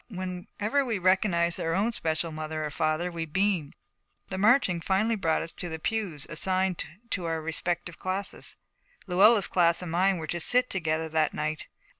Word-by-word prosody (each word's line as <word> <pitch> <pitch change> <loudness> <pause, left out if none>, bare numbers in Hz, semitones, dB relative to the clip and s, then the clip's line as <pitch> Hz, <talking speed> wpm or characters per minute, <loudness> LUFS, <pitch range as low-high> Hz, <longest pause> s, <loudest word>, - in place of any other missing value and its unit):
Whenever 185 +6 -2
we 235 -5 -1
recognized 180 -2 +2
our 165 0 -1
own 215 +5 +1
special 160 -3 -1
mother 155 0 -4
or 150 - -4
father, 155 +3 -1
we 165 -1 -4
beamed. 170 -1 -1 0.5
The 190 - -4
marching 205 -5 +3
finally 205 +6 +1
brought 165 -6 0
us 165 - -6
to 175 - -7
the 160 - -4
pews 175 -5 -3
assigned 185 +2 +2 0.3
to 180 - -1
our 165 -1 -1
respective 165 +2 -3
classes. 190 +1 0 0.5
Luella's 200 +3 +5
class 170 -1 +2
and 170 - -6
mine 185 +2 +2
were 160 - -5
to 175 +2 -3
sit 250 +8 +4
together 160 -3 -1
that 155 -1 0
night. 155 0 -3
175 Hz, 170 wpm, -27 LUFS, 160-195 Hz, 0.5 s, Luella's